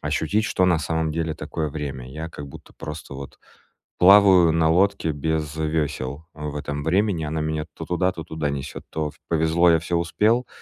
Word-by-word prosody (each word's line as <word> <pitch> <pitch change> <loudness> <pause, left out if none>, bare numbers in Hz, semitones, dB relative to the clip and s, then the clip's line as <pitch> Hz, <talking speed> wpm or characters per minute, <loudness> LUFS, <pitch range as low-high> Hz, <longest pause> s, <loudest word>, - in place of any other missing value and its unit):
ощутить, 80 +8 0
что 95 - +1
на 85 -3 +3
самом 80 0 -1
деле 80 -1 -2
такое 80 0 -4
время. 70 -4 -6
Я 80 +4 -6
как 75 -3 -8
будто 70 - -13
просто 75 -3 -8
вот 70 0 -9 0.6
плаваю 95 -3 +7
на 80 -1 +2
лодке 95 0 +2
без 75 0 -2
вёсел 75 -2 -2
в 75 -1 -6
этом 75 0 -4
времени, 90 +1 +1
она 80 +1 -2
меня 75 0 -2
то - - -7
туда, 90 +1 +1
то 80 -3 -7
туда 80 -2 -3
несёт. 70 -1 -5
То 75 -1 -3
в - - -24
повезло- 80 +2 +3
я 80 - +4
всё 85 +2 -3
успел, 110 +8 +1
80 Hz, 185 wpm, -23 LUFS, 75-85 Hz, 0.6 s, плаваю